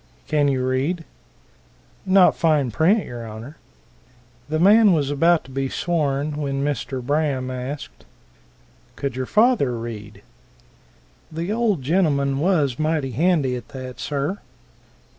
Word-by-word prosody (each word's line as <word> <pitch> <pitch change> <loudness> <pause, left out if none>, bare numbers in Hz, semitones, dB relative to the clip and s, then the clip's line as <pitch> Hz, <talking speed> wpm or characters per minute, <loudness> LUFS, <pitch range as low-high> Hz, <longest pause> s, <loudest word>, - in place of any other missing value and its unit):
"Can 145 -1 +2
you 130 -2 0
read?" 140 +7 -1 1.0
"Not 185 -1 +5
fine 150 -6 +1
print, 185 - +2
y'r 120 -1 -7
Honor." 115 +7 -9 0.9
The 155 - 0
man 205 +4 +6
was 145 -3 0
about 165 +3 +3
to 135 - -15
be 135 0 -2
sworn, 150 -3 -1
when 140 -2 -2
Mr. 135 -2 -3
Braham 140 -2 -1
asked, 130 +3 -7 0.9
"Could 140 -3 -4
your 130 -1 -3
father 215 - +3
read?" 105 -3 -8 1.1
"The 165 +5 -3
old 215 - 0
gentleman 140 -4 +1
was 150 -7 +1
mighty 155 -3 0
handy 145 -1 +1
at 120 -2 -7
that, 130 -1 -8
sir." 145 +7 -2
145 Hz, 125 wpm, -22 LUFS, 130-165 Hz, 1.1 s, man